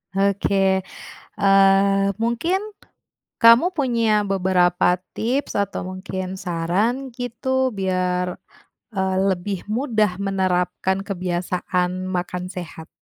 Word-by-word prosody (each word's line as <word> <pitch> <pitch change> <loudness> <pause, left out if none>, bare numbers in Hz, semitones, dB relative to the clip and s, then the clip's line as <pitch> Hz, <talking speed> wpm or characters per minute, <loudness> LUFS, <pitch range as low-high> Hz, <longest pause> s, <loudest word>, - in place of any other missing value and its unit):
Oke, 195 -1 +2 0.6
eee, 195 0 +4
mungkin, 235 +12 0 0.8
kamu 235 +10 +6
punya 230 -7 +2
beberapa 180 -2 +2 0.2
tips 255 +6 -1
atau 200 -1 -2
mungkin 185 0 -5
saran 195 +11 -1
gitu 255 +1 -1
biar, 180 -2 -1 0.6
eee, 190 0 0
lebih 190 +1 -3
mudah 215 -6 0
menerapkan 190 -1 0
kebiasaan 180 0 -2
makan 180 0 -3
sehat? 165 -3 -8
195 Hz, 90 wpm, -22 LUFS, 180-225 Hz, 0.8 s, kamu